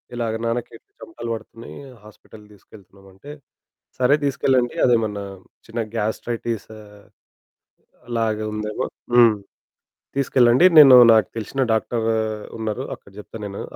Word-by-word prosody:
ఇలాగ, 115 -2 -2
"నాన్నకి 115 +1 -3 0.3
చెమటలు 335 - -8
పడుతున్నాయి, 115 +1 -12 0.3
హాస్పిటల్‌కి 105 0 -17
తీసుకెళ్తున్నాం" 95 -1 -19
అంటే, 140 +10 -13 0.7
సరే 130 +3 +3
తీసుకెళ్లండి 130 -3 0
అదేమన్నా 110 -4 0 0.4
చిన్న 115 +1 -5 0.2
గ్యాస్ట్రైటిస్ 115 0 -4 1.4
అలాగ 115 -2 -1 0.2
ఉందేమో. 105 0 -4 0.3
హ్మ్. 120 -3 +6 0.8
తీసుకెళ్లండి 125 +1 +3
నేను 135 -4 +10 0.2
నాకు 110 -3 +2
తెలిసిన 125 +5 -4
డాక్టరు 115 0 -1 0.5
ఉన్నారు. 110 +3 -4
అక్కడ - - -21
చెప్తాను 105 +1 -10
నేను 100 0 -8
115 Hz, 105 wpm, -21 LUFS, 105-120 Hz, 1.4 s, నేను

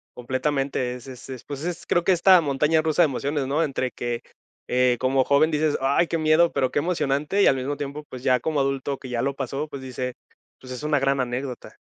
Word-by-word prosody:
Completamente, 130 0 -1
es 125 +1 -11
es 130 0 -10
es, 130 -3 -7
pues, 145 0 -7
es 175 0 -4
creo 175 - +1
que 190 - +3
esta 180 0 +6
montaña 150 +2 +2
rusa 160 +2 +3
de - - +6
emociones, 140 0 -2
no 150 +4 +1
entre 130 -4 -2
que, 120 -1 -4 0.5
eh, 125 -1 +2
como 130 0 +2
joven 145 +4 +3
dices: 155 0 +1
"Ay, 140 +6 +2
qué 165 - -1
miedo", 155 +2 +4
pero, 130 -1 0
qué - - +1
emocionante 150 +2 0
y - - +6
al - - +5
mismo 135 +2 -3
tiempo, 145 +1 -5
pues, 130 0 -9
ya 125 -2 +3
como 150 +4 -1
adulto 135 0 -1
que 130 - -10
ya 120 -1 -1
lo 140 +2 -1
pasó, 135 +3 -3
pues, 140 -3 -8
dice: 125 -1 -4 0.5
"Pues 130 - -11
es 125 - -7
una 150 -1 +2
gran 135 0 +1
anécdota". 125 0 -4
140 Hz, 225 wpm, -24 LUFS, 130-155 Hz, 0.5 s, esta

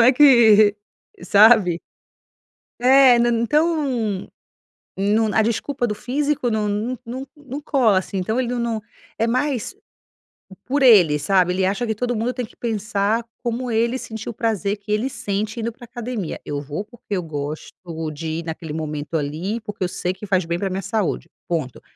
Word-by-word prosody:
não - - +7
é 255 +3 +7
que 225 -7 +6 0.5
sabe. 205 -5 +5 1.0
É 255 -1 +6
não, 240 0 +3
então 260 - 0 0.7
não 210 +2 +1
a 220 - +4
desculpa 240 +2 -1
do 210 - -2
físico 265 +3 -1
não 210 -1 0
não 220 +5 -2
não 260 +4 -6
não 285 0 -7
cola 245 -10 +3
assim. 190 +1 -4
Então 220 +7 -1
ele 255 - +1
não 245 -1 -2
não 225 -2 -2 0.4
é 225 - +2
mais 255 0 -1 0.9
por 280 +3 0
ele, 180 - +6
sabe. 180 +4 +2
Ele 185 +1 +1
acha 200 +6 0
que 220 - -1
todo 245 +2 -2
mundo 235 +3 -1
tem 250 -3 -3
que - - -20
pensar 220 0 -1 0.2
como 240 +1 -2
ele 235 +2 +1
sentiu, 220 -2 -6
o - - -11
prazer 210 -3 -1
que 205 +1 -20
ele 215 +6 0
sente 220 -2 -3
indo 230 - -1
para 245 - -16
a - - -7
academia. 240 -7 -4
Eu 145 -1 -3
vou 150 +8 -5
porque 215 -4 -6
eu 180 - -3
gosto 150 -1 -6 0.4
de 160 +2 -4
ir - - -6
naquele 160 -1 -6
momento 155 0 -3
ali, 160 +10 -3
porque 210 -3 -5
eu 180 - 0
sei 180 0 -2
que 190 - -10
faz 185 -3 +1
bem 170 +1 -2
para 195 - -2
a - - -3
minha 190 +1 -3
saúde, 210 0 -2 0.2
ponto. 155 -8 -3
220 Hz, 185 wpm, -21 LUFS, 190-245 Hz, 1.0 s, não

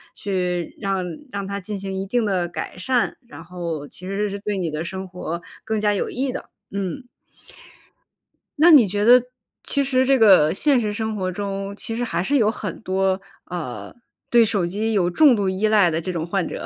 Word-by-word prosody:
去 180 -3 -2
让 195 -2 -1 0.3
让 200 -1 -4
它 200 0 -3
进 205 +1 -5
行 195 0 -5
一 195 - -3
定 235 +1 +1
地 185 -3 0
改 175 - -6
善。 245 +4 0
然 165 - -11
后 170 -4 -5
其 185 - -10
实 205 +2 -1
是 200 +1 -5
对 205 -1 -3
你 175 -3 -1
的 155 +2 -3
生 190 +1 -6
活 175 -2 -5 0.2
更 220 -1 -1
加 210 0 +2
有 200 - -1
益 260 +1 -2
的， - - -7 0.2
嗯。 200 +6 -4 1.5
那 340 +2 +7
你 255 -9 +8
觉 205 +2 -1
得 250 +1 +7 0.4
其 280 -1 +1
实 260 -1 +2
这 270 0 +4
个 190 -9 +6
现 275 +4 +3
实 210 -2 -1
生 220 0 -3
活 185 -2 -2
中， 195 0 -4
其 225 +2 -4
实 245 - -2
还 185 -6 -1
是 285 +7 +2
有 215 -3 +3
很 225 - -5
多， 190 0 0 0.3
呃， 155 -9 -5 0.4
对 235 -1 +7
手 205 -5 +1
机 215 +5 -2
有 180 -3 +2
重 285 - +6
度 200 -2 0
依 190 +3 +1
赖 205 -6 +4
的 165 +1 -1
这 185 - -3
种 165 -2 -3
患 180 0 -1
者。 - - -6
200 Hz, 220 characters per minute, -22 LUFS, 180-220 Hz, 1.5 s, 你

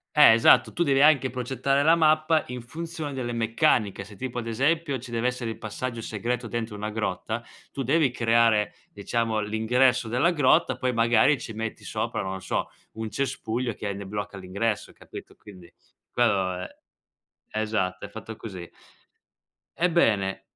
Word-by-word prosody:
Eh, 150 -6 +9
esatto, 115 - +5
tu - - -3
devi 135 -4 +3
anche 145 -3 +5
progettare 130 +3 0
la 160 +3 +6
mappa 155 0 +3
in 125 0 -6
funzione 160 +2 -6
delle 125 -2 -3
meccaniche. 115 -3 +1
Se 100 +1 -13
tipo 125 +3 -4
ad 115 - -6
esempio 140 +5 0
ci 125 0 -10
deve 115 +1 0
essere 125 -2 -3
il - - -9
passaggio 115 +2 -5
segreto 120 +3 -3
dentro 115 -1 -4
una 105 +1 -4
grotta, 110 +1 -3 0.3
tu 135 - -4
devi 145 +3 +3
creare, 115 -3 +2 0.2
diciamo, 110 +2 -1
l'ingresso 120 +4 +2
della 125 +10 +2
grotta, 155 +1 +3
poi 130 -1 0
magari 115 +4 +3
ci 110 - -7
metti 110 +1 -5
sopra, - - -3
non 95 0 -5
so, - - -2 0.2
un 110 -1 -5
cespuglio 120 -1 -2
che 105 - -8
hai 100 - -3
ne 100 0 -7
blocca 100 0 -5
l'ingresso, 100 +3 -2
capito, - - -12
quindi 90 -4 -15 0.4
quello 95 -6 +1
è - - -8 0.9
esatto, 95 -4 -2
è - - -14
fatto 110 0 -8
così. 95 -6 -8 1.0
Ebbene 115 - +1
115 Hz, 160 wpm, -26 LUFS, 105-135 Hz, 1.0 s, Eh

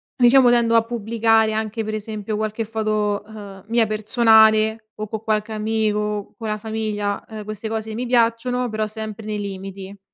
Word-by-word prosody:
diciamo 250 0 +6
tendo 235 -1 +3
a 225 - +5
pubblicare 225 -1 +1
anche, 220 +1 -2
per 215 0 -4
esempio, 215 0 -4
qualche 215 +1 -2
foto, 215 -2 -1
ehm, 205 -3 -11
mia 230 0 +3
personale 220 0 +4
o 215 0 -5
co' 220 0 -4
qualche 215 0 -1
amico, 210 -1 -1
con 225 -2 -5
la 215 0 -1
famiglia, 215 -2 -3
uhm, 215 -1 -7
queste 215 +1 -6
cose 220 0 -4
mi 250 +2 -3
piacciono 245 +1 +1
però 215 0 -1
sempre 220 0 -7
nei 210 -1 -3
limiti. 195 0 -7
220 Hz, 165 wpm, -21 LUFS, 210-225 Hz, -, diciamo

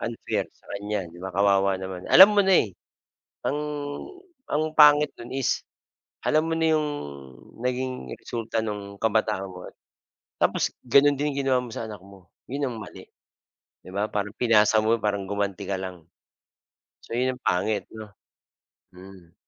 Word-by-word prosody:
unfair 115 0 -2
sa - - -27
kanya 100 -2 -3
'di 85 - -15
ba, 95 +2 -7
kawawa 100 -1 +2
naman. 95 -1 -6
Alam 205 +2 +9
mo - - +7
na, 190 - +3
eh, 100 -5 -5 0.7
ang, 145 - 0 0.9
ang 155 +1 0
pangit 150 -1 +6
no'n 120 - -9
is 135 -1 -1 0.7
alam 155 +1 +3
mo 165 - 0
na 160 -1 +3
'yong 155 -1 0 0.8
naging 125 - -3
resulta 115 -1 -3
no'ng 100 -2 -5
kabataan 110 -3 0
mo. 90 -1 -10 0.8
Tapos, - - +1
gano'n 140 +4 +5
din 145 +2 -1
ginawa 135 -2 +2
mo 125 - -8
sa 115 - -5
anak 105 -4 -9
mo, 95 -2 -17 0.2
yun 140 +2 -2
ang 120 -4 -5
mali 100 - -11 0.8
'di - - -12
ba. 100 +3 -1
Parang 105 -1 -3
pinasa 110 -2 +4
mo, 110 +1 +3
parang 100 -2 -1
gumanti 100 -1 -3
ka 100 - -1
lang. 95 -3 -6 1.0
So 115 - -5
yun 130 +1 +1
ang 125 - -14
pangit 100 +2 0
'no 110 -1 -9 0.9
mm. 90 -2 -14
110 Hz, 155 wpm, -25 LUFS, 95-130 Hz, 1.0 s, Alam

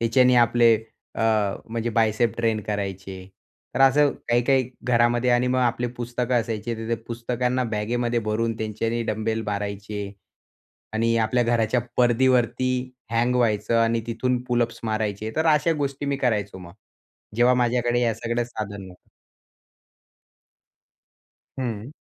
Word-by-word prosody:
त्याच्याने 125 +2 +4
आपले 120 -1 +5 0.4
अ - - -2 0.5
म्हणजे 115 +1 -2
बायसेप 110 +1 +1
ट्रेन 115 -2 0
करायचे. 95 -2 -4 0.6
तर - - -1
असं 145 +2 +5 0.2
काही-काही 125 +1 +2 0.2
घरामध्ये 120 0 +2
आणि 120 +1 +3
मग 130 +1 +1
आपली 120 -1 +1
पुस्तकं 120 +1 -2
असायचे. 115 +1 -4
तर 110 0 -6
त्या 115 - +1
पुस्तकांना 125 +2 -1
बॅगेमध्ये 120 +3 0
भरून, 115 +2 0
त्यांच्याने 115 +2 -2
डंबेल 110 +1 -2
मारायचे 105 0 -4 0.9
आणि 115 +1 +1
आपल्या 115 +2 +2
घराच्या 115 0 +1 0.2
परदीवरती 125 0 +3 0.4
हँग 120 +2 +1
व्हायचं 110 -2 +1
आणि 115 0 +1
तिथून 125 +2 -1
पूलअप्स 120 -1 0
मारायचे. 110 -1 -2
तर 160 - +1
अशा 150 +2 +2
गोष्टी 140 +1 -3
मी 140 -1 -1
करायचो 105 -7 -1
मग. 85 -2 -11 0.6
जेव्हा 120 +2 +4
माझ्याकडे 120 0 +1
या 115 -2 +2
सगळं 120 +2 -2
साधन 105 -4 -6
नव्हते. 90 - -17 2.5
हं. 120 -1 -4
115 Hz, 130 wpm, -24 LUFS, 110-125 Hz, 2.5 s, आपले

